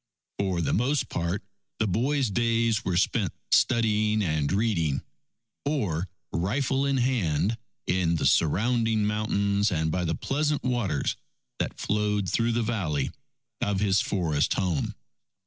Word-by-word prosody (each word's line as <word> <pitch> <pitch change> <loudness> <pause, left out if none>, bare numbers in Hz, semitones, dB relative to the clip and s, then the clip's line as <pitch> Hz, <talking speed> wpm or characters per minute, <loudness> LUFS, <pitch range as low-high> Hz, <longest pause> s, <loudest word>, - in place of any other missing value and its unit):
For 95 -3 0
the - - 0
most 135 +7 +1
part, 85 +3 -2 0.3
the 110 - +1
boy's 125 +5 +1
days 115 0 +1
were 90 -2 0
spent 95 0 +1 0.2
studying 110 -3 +3
and 75 -5 0
reading, 95 -9 +1 0.6
or 100 - -1 0.2
rifle 135 +10 0
in 140 -1 +1
hand, 110 - +1 0.3
in 90 -2 +1
the 80 - -1
surrounding 110 +5 +2
mountains 105 -1 +1
and 80 -2 0
by 90 +1 -1
the 80 0 0
pleasant 150 +1 -1
waters 120 - 0 0.4
that - - -3
flowed 105 -1 0
through 115 +5 +1
the 120 0 +1
valley 90 - -1 0.5
of 100 -2 0
his 100 -1 +3
forest 80 -7 0
home. 90 -7 -1
105 Hz, 130 wpm, -27 LUFS, 90-115 Hz, 0.6 s, studying